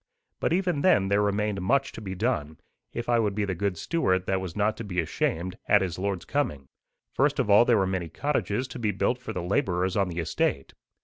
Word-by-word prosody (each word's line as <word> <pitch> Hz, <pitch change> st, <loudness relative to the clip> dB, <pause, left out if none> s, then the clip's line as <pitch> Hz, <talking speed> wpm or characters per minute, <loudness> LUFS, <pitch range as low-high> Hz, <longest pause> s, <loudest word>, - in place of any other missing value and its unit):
But -, -, 0 dB
even 175 Hz, -4 st, +1 dB
then 100 Hz, -, +4 dB
there 100 Hz, +1 st, +3 dB
remained 105 Hz, -1 st, 0 dB
much 135 Hz, +8 st, +1 dB
to -, -, -9 dB
be 95 Hz, -3 st, -5 dB
done, 90 Hz, -, -1 dB, 0.3 s
if 120 Hz, -, -5 dB
I 120 Hz, -1 st, +3 dB
would 105 Hz, -3 st, 0 dB
be 105 Hz, -1 st, 0 dB
the 95 Hz, -, -2 dB
good 95 Hz, 0 st, -2 dB
steward 95 Hz, -, 0 dB
that 95 Hz, 0 st, 0 dB
was 90 Hz, -3 st, -6 dB
not 105 Hz, +1 st, +1 dB
to -, -, -5 dB
be 90 Hz, -4 st, -3 dB
ashamed 85 Hz, +2 st, -2 dB
at 105 Hz, -2 st, +5 dB
his 90 Hz, -2 st, -4 dB
Lord's 100 Hz, -2 st, -2 dB
coming. 120 Hz, -, -1 dB, 0.5 s
First -, -, +2 dB
of 105 Hz, -, +1 dB
all 105 Hz, +4 st, +7 dB
there 120 Hz, -2 st, +4 dB
were 95 Hz, -, +2 dB
many 95 Hz, -3 st, -2 dB
cottages 125 Hz, -, -1 dB
to 125 Hz, -, -7 dB
be 110 Hz, -3 st, 0 dB
built 105 Hz, +5 st, 0 dB
for 125 Hz, -3 st, -6 dB
the 90 Hz, -5 st, -4 dB
labourers 90 Hz, 0 st, 0 dB
on 100 Hz, -2 st, +2 dB
the 85 Hz, -, -6 dB
estate. 80 Hz, -4 st, -1 dB
100 Hz, 230 wpm, -27 LUFS, 90-115 Hz, 0.5 s, all